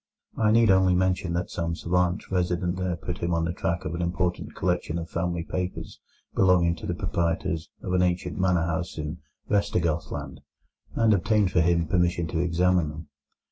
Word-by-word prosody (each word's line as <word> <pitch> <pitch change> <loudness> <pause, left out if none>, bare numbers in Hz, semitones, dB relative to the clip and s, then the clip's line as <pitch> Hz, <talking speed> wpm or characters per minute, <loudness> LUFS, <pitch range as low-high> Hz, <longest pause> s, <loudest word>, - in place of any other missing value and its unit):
I 110 -1 +2
need 115 -1 +5
only 95 -1 +4
mention 90 -1 +1
that 85 +1 -2
some 85 -1 -2
savant 90 +5 0
resident 90 -1 0
there 90 -2 -1
put 90 +1 -6
him 85 0 0
on 85 0 +1
the 85 - -2
track 85 +2 -2
of 75 - -3
an 85 - -3
important 90 0 -2
collection 85 -2 -1
of 85 -1 -6
family 85 0 -1
papers 90 +2 -4 0.3
belonging 90 -3 +4
to - - -7
the - - -1
proprietors 80 -1 -1
of 90 - -2
an 90 - +3
ancient 90 +1 0
manor 90 -3 +2
house 85 +1 -3
in 75 +2 -4 0.3
Vestergothland, 85 -7 -1 0.6
and 115 -1 +4
obtained 105 0 +2
for 90 - +3
him 85 0 +2
permission 85 0 +1
to 80 - -2
examine 90 -1 +2
them. 75 0 -9
90 Hz, 180 wpm, -26 LUFS, 85-90 Hz, 0.6 s, need